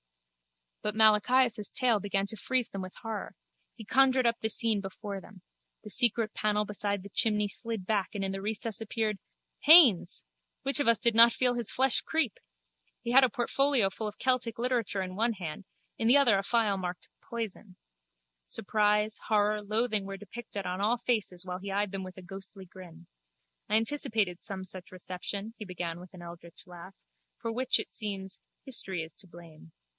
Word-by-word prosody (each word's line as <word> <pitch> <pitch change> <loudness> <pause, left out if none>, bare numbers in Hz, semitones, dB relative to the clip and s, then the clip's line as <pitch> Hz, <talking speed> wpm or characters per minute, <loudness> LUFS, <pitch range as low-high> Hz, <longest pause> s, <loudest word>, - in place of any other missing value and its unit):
But 210 0 -3
Malachias' 220 +1 +4
tale 240 -4 +2
began 195 0 -1
to 210 - -6
freeze 250 +3 -1
them 195 - -5
with 185 0 -9
horror. 225 -2 -6 0.4
He 225 - -11
conjured 260 +2 +3
up 235 0 +1
the 220 - 0
scene 220 -2 0
before 195 0 -7
them. 190 -3 -16 0.4
The 210 - -5
secret 230 -1 +2
panel 210 0 0
beside 205 -1 -3
the 200 - -10
chimney 210 0 +1
slid 225 -2 -5
back 205 -1 -1
and 200 - -3
in 195 - -1
the 195 0 -5
recess 220 +1 -1
appeared... 215 -2 -2 0.4
Haines! 285 - +7 0.4
Which 275 +2 +1
of 285 - 0
us 230 -2 +6
did 235 - +3
not 230 +1 +8
feel 250 -1 +2
his 240 -3 +2
flesh 265 0 +3
creep! 320 -10 -2 0.6
He 235 - -3
had 265 +2 +7
a 255 - +4
portfolio 245 -2 +2
full 215 +2 -5
of 210 - -8
Celtic 250 -3 0
literature 235 -5 -1
in 185 0 -7
one 230 +3 +1
hand, 180 -1 -7 0.3
in 225 - 0
the 250 +4 +7
other 255 -7 +5
a 195 - +1
phial 210 -1 +1
marked 180 -1 -6
Poison. 215 -4 -7 0.7
Surprise, 210 - +1
horror, 210 0 +1
loathing 215 0 0
were 195 0 -6
depicted 210 -1 -8
on 180 +2 -3
all 225 +4 +1
faces 210 -7 -1
while 180 0 -5
he 195 +1 -7
eyed 200 0 -1
them 195 -1 -5
with 185 0 -9
a 185 - -11
ghostly 195 +1 -9
grin. 175 - -14 0.6
I 215 - +2
anticipated 220 -6 +1
some 190 -1 -5
such 185 -1 -6
reception, 185 +4 -6
he - - -7
began 175 -2 -5
with 180 0 -13
an 175 - -11
eldritch 170 +1 -12
laugh, 180 +1 -12 0.4
for 230 - -4
which, 255 +2 +1
it - - -6
seems, 195 -3 -4 0.2
history 190 - +1
is 160 0 -9
to 195 - -11
blame. 165 - -15
210 Hz, 185 wpm, -29 LUFS, 190-230 Hz, 0.7 s, not